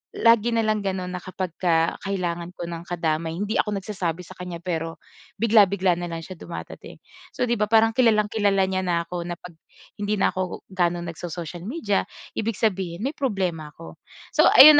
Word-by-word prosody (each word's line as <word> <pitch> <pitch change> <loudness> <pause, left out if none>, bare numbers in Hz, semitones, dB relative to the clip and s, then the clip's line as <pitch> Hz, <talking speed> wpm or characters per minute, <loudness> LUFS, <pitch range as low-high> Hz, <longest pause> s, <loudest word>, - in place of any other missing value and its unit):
lagi 230 0 +5
na 230 - +2
lang 215 -1 +1
gano'n 185 -2 -2
na 180 - -3
kapagka 175 -3 0
kailangan 175 -3 -2
ko 170 - -5
ng 170 -1 -5
kadamay, 165 -2 -1
hindi 205 +4 -2
ako 210 -1 +1
nagsasabi 180 -4 -3
sa - - -11
kaniya 180 -2 -6
pero 165 -2 -3 0.4
bigla-bigla 200 -5 +5
na 175 0 -4
lang 165 - -3
siya 185 - -8
dumadating. 170 - -8 0.4
So 250 - 0
'di 240 - +2
ba 210 0 +1
parang 225 0 +6
kilalang-kilala 210 -4 +3
niya 190 0 -1
na 170 -2 +1
ako 175 -1 -3
na 175 - -3
'pag 180 -2 -11 0.5
hindi 210 +1 +1
na - - +4
ako 185 -1 -3
ga'no 175 -2 +1
nagso-social 170 0 -6
media, 215 -6 0 0.3
ibig 220 -2 -2
sabihin 190 -3 0
may 290 - -4
problema 185 - -1
ako. 80 -1 -11 0.4
So - - +7
ayun 295 +1 +11
185 Hz, 180 wpm, -24 LUFS, 170-210 Hz, 0.5 s, ayun